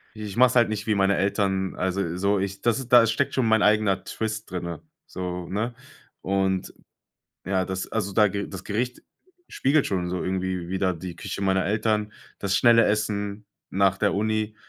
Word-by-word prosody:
Ich 105 -1 -7
mach's 125 0 +5
halt 120 -2 +5
nicht, 105 -1 -3
wie 110 - +1
meine 100 0 +2
Eltern, 95 -1 0
also 95 -2 -1
so, 100 +2 +2
ich 100 0 -3
das 120 -2 +2
ist 130 -2 -6
da 115 -2 +8
steckt 135 +5 0
schon 130 -3 +1
mein 110 -1 +4
eigener 105 -2 +3
Twist 110 -2 -4
drinne, 85 -2 -5 0.3
so, 90 -1 -5
ne? 110 +5 -2 0.5
Und 95 -1 0 0.7
ja, 95 -1 0
das 95 0 -4
also 100 -3 -2
da 105 +1 +4
das 95 -1 -5
Gericht 120 +5 -3 0.5
spiegelt 140 +2 +2
schon 90 -3 -1
so 90 0 -3
irgendwie 95 -2 -2
wider 95 -1 0
die 85 +1 -7
Küche 100 - -5
meiner 95 -1 +2
Eltern, 105 0 0 0.3
das 100 -1 0
schnelle 115 -1 +6
Essen 105 0 -1 0.3
nach 95 0 +2
der 100 - +1
Uni, 110 +1 -1
100 Hz, 175 wpm, -25 LUFS, 95-110 Hz, 0.7 s, da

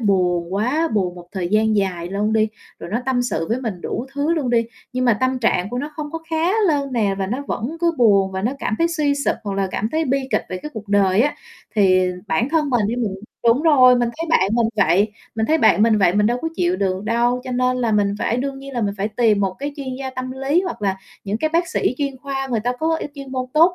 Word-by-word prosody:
buồn 180 -4 +1
quá, 265 +11 +1
buồn 185 -4 0
một 175 -1 -11
thời 180 -3 -2
gian 215 +1 +2
dài 180 -4 -1
luôn 205 +3 -1
đi, 220 0 +3 0.3
rồi - - -8
nó 225 +4 0
tâm 255 -2 +1
sự 205 -9 -2
với 240 +3 0
mình 210 -8 -4
đủ 250 - -4
thứ 290 +3 +1
luôn 280 -6 -1
đi, 230 -1 +2 0.3
nhưng 255 0 -1
mà 240 - +5
tâm 260 0 +1
trạng 200 -5 +1
của 245 - -3
nó 290 +3 -4
không 295 -1 -5
có 325 - -3
khá 325 +4 +1 0.2
lên 280 -4 0
nè 210 -5 +1
và 190 - -1
nó 250 +8 -3
vẫn 255 +10 -3
cứ 340 -1 +2
buồn, 200 -5 +4
và 190 0 -3
nó 245 +5 0
cảm 215 - -1
thấy 335 - +3
suy 300 -4 +1
sụp 280 0 0
hoặc 200 -1 -3
là 195 0 0
cảm 215 - -2
thấy 320 +1 +1
bi 275 -1 +1
kịch - - +1
về 185 - -4
cái 300 - -6
cuộc 210 -2 -7
đời 200 0 +3
á. 290 +4 +2 0.4
Thì 185 -3 +4 0.2
bản 195 - +1
thân 300 -3 +1
mình 235 -5 +2
đi, 230 +3 -2
mình 220 -6 -1 0.3
đúng 235 +6 +4
rồi, 260 -6 +6
mình 240 -1 +1
thấy 330 - -2
bạn 190 -10 +4
mình 235 -1 +3
vậy 205 +1 +3 0.2
mình 220 0 0
thấy 320 +5 +3
bạn 220 -5 +4
mình 220 -1 +4
vậy 180 -2 +3
mình 210 0 +3
đâu 240 +2 +1
có 325 - 0
chịu 175 +1 +1
được 190 0 -1
đâu. 240 +2 +1
Cho 260 - -5
nên 255 0 +1
là 235 -3 0
mình 200 -1 +2
phải 230 - 0
đương 270 +2 -3
nhiên 275 0 -9
là 245 - -2
mình 200 -2 -1
phải 205 - 0
tìm 220 -2 +2
một 190 -1 0
cái 285 +1 -4
chuyên 275 -2 -6
gia 265 -1 -4
tâm 255 0 -5
lý 270 +6 +1
hoặc 355 - -5
là 195 -1 0 0.3
những 205 +1 -1
cái 310 +5 0
bác 340 0 +2
sĩ - - 0
chuyên 275 -2 -2
khoa, 270 0 -4
người 230 -3 0
ta 245 +3 0
có 320 +1 +1
y - - -4
chuyên 275 -2 -9
môn 255 -1 -1
tốt 335 +4 +5
235 Hz, 275 wpm, -21 LUFS, 200-275 Hz, 0.4 s, rồi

